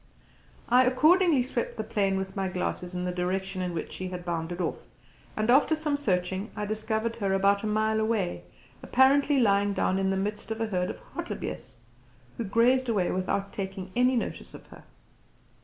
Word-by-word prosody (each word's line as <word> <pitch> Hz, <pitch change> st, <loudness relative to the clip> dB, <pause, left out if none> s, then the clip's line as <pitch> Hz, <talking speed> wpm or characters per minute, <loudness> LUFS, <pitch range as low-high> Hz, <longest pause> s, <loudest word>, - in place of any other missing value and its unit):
I 250 Hz, +2 st, +5 dB
accordingly 310 Hz, +3 st, +4 dB
swept 245 Hz, -1 st, -3 dB
the 220 Hz, -, -2 dB
plain 200 Hz, -3 st, 0 dB
with 190 Hz, 0 st, -4 dB
my 195 Hz, -1 st, -1 dB
glasses 180 Hz, 0 st, -3 dB
in 180 Hz, 0 st, -2 dB
the 180 Hz, -, -1 dB
direction 185 Hz, +1 st, -2 dB
in 180 Hz, -1 st, -2 dB
which 160 Hz, -, -4 dB
she 185 Hz, -, -5 dB
had 180 Hz, -1 st, -6 dB
bounded 170 Hz, 0 st, -3 dB
off, 175 Hz, -, -2 dB, 0.6 s
and 215 Hz, 0 st, 0 dB
after 290 Hz, +5 st, +5 dB
some 305 Hz, -2 st, -1 dB
searching 190 Hz, -5 st, -1 dB
I 210 Hz, -1 st, -3 dB
discovered 220 Hz, +2 st, -2 dB
her 200 Hz, -3 st, 0 dB
about 200 Hz, +1 st, +3 dB
a -, -, -1 dB
mile 215 Hz, +1 st, +1 dB
away, 220 Hz, -5 st, -1 dB, 0.4 s
apparently 275 Hz, +2 st, +4 dB
lying 200 Hz, -3 st, +3 dB
down 190 Hz, -, +1 dB
in 190 Hz, 0 st, +1 dB
the 195 Hz, -, 0 dB
midst 210 Hz, +3 st, -3 dB
of 220 Hz, 0 st, -3 dB
a 225 Hz, -, 0 dB
herd 180 Hz, -4 st, -1 dB
of -, -, -5 dB, 0.2 s
hartebeeste, 130 Hz, 0 st, -6 dB, 0.6 s
who -, -, -2 dB
grazed 245 Hz, +5 st, +3 dB
away 195 Hz, -6 st, +1 dB
without 190 Hz, +2 st, -2 dB
taking 190 Hz, -1 st, -5 dB
any 250 Hz, +1 st, +3 dB
notice 235 Hz, -, -4 dB
of -, -, -12 dB
her. -, -, -14 dB
205 Hz, 185 wpm, -28 LUFS, 185-235 Hz, 0.6 s, I